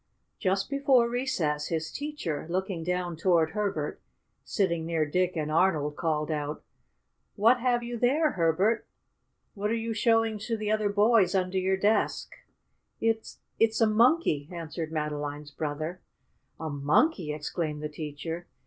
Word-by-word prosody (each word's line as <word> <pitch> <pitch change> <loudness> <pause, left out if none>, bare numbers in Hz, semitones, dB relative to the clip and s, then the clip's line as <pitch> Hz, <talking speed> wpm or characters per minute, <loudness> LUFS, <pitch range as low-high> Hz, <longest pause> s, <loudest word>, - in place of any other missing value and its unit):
Just 195 -1 +1
before 275 -4 +3
recess, 170 - -1
his 160 -1 -2
teacher, 285 - -4
looking 185 -1 -2
down 180 0 -2
toward 165 -1 +2
Herbert, 205 +1 -2 0.4
sitting 170 -5 0
near 160 -1 0
Dick 180 +4 0
and 155 -1 -2
Arnold, 155 -3 +2
called 155 -2 -1
out: 150 0 -3 0.7
"What 230 +4 +4
have 240 -1 +1
you 235 0 -5
there, 290 +6 +3
Herbert? 185 +6 +1 0.7
What 205 +1 -2
are 230 - +1
you 225 0 -2
showing 225 -1 +2
to 225 +2 -2
the 215 -1 -2
other 215 -1 +1
boys 205 -2 +4
under 185 0 +1
your 190 +1 +1
desk?" 210 +3 +1 0.7
"It 225 0 -1 0.2
it's 225 0 +3
a 225 - +5
Monkey!" 220 - +3
answered 165 -1 -5
Madeline's 150 -1 -3
brother. 155 +4 -4 0.6
"A 160 - -4
monkey!" 150 - +2
exclaimed 150 0 -3
the - - -1
teacher. 155 +3 -6
185 Hz, 140 wpm, -28 LUFS, 155-225 Hz, 0.7 s, a